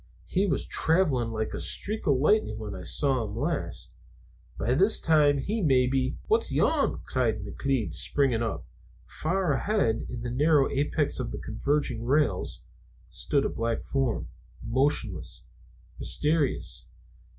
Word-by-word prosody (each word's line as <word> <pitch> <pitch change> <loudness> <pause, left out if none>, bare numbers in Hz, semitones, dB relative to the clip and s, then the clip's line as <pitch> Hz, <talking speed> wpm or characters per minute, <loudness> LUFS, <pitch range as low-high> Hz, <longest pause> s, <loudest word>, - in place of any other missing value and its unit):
He 195 +2 0
was - - 0
traveling 155 -9 +1
like 110 -1 -3
a - - -4
streak 215 +2 -1
of 140 -3 +4
lightning 150 - +2
when 105 -2 -6
I - - -7
last 90 - -1
saw 135 -5 +1
him. 105 -1 -6 1.2
By 115 +5 0
this 195 +10 +3
time 150 -3 +4
he 210 +11 -2
may 130 -7 +4
be 130 +1 0
" - - -26
"What's 445 +1 +1
yon?" 310 -3 +1
cried 110 -5 -1
McLeod, 130 +2 -2
springing 135 -5 +3
up. 115 - -3 0.4
Far 175 0 -1
ahead, 140 - 0
in 120 -2 -6
the 120 - -3
narrow 145 +2 +3
apex 145 +1 0
of 125 - -3
the - - -5
converging 125 0 -1
rails 130 -6 0 0.5
stood 140 -1 0
a - - +1
black 115 0 -2
form, 135 -4 -1 0.4
motionless, 115 - -1 0.6
mysterious. 150 -2 -1
135 Hz, 145 wpm, -27 LUFS, 115-155 Hz, 1.2 s, of